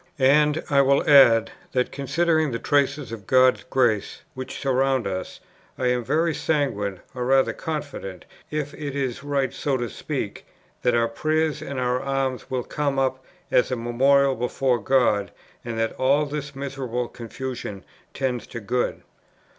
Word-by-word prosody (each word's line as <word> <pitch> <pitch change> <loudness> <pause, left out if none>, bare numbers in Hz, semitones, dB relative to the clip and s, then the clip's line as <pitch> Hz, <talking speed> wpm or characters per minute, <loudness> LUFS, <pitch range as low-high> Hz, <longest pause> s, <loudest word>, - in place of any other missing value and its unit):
"And 150 +3 +4
I 140 -1 +4
will 140 0 +3
add, 120 -6 +7 0.2
that, 125 -1 +1
considering 160 +3 +1
the 115 - -2
traces 140 -1 0
of 105 -4 -8
God's 130 0 +4
grace 120 -6 0
which 130 0 -6
surround 135 -2 +1
us, 95 -1 -4 0.4
I 125 - +1
am 125 -1 0
very 160 +7 +1
sanguine, 110 - -1
or 125 -1 -3
rather 135 +1 +3
confident, 140 - -5 0.2
(if 150 -1 -3
it 145 -3 -5
is 135 -2 -2
right 140 -2 -1
so 140 -2 -1
to 120 -1 -2
speak,) - - -5 0.3
that 125 -1 +2
our 115 0 +3
prayers 155 +5 0
and 140 -3 -5
our 125 0 0
alms 135 -1 -2
will 130 -1 -1
come 145 0 -2
up 130 -1 0 0.3
as 125 - +3
a 130 - 0
memorial 135 +4 +3
before 125 0 0
God, 110 -5 +2 0.3
and 115 -1 -5
that 115 0 0
all 140 +3 +3
this 145 -1 -5
miserable 130 -3 -3
confusion 120 -4 -7 0.3
tends 125 -4 -2
to 120 - -6
good. 120 +3 -2
130 Hz, 155 wpm, -24 LUFS, 120-140 Hz, 0.4 s, add